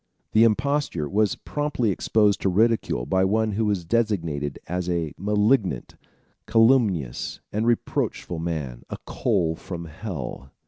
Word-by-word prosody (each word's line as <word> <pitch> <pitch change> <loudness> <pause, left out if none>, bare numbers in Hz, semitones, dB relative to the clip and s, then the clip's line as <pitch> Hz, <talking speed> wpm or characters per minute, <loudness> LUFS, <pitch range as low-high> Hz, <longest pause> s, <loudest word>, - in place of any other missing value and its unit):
The 110 +1 +6
imposture 130 - 0
was 105 +4 +1
promptly 145 -7 -1
exposed 105 +2 +2
to 95 - +2
ridicule 110 - +1
by 95 +7 +2
one 110 +3 +2
who 110 +2 0
was 100 -5 0
designated 85 -9 0
as 90 0 -3
"a 85 -4 -1
malignant, 105 - +1 0.5
calumnious, 110 - +2
and 110 +2 0
reproachful 100 -6 -1
man, 75 -8 -4
a - - -5
coal 80 -1 0
from 85 0 -7
hell." 75 - -6
100 Hz, 130 wpm, -24 LUFS, 80-110 Hz, 0.5 s, The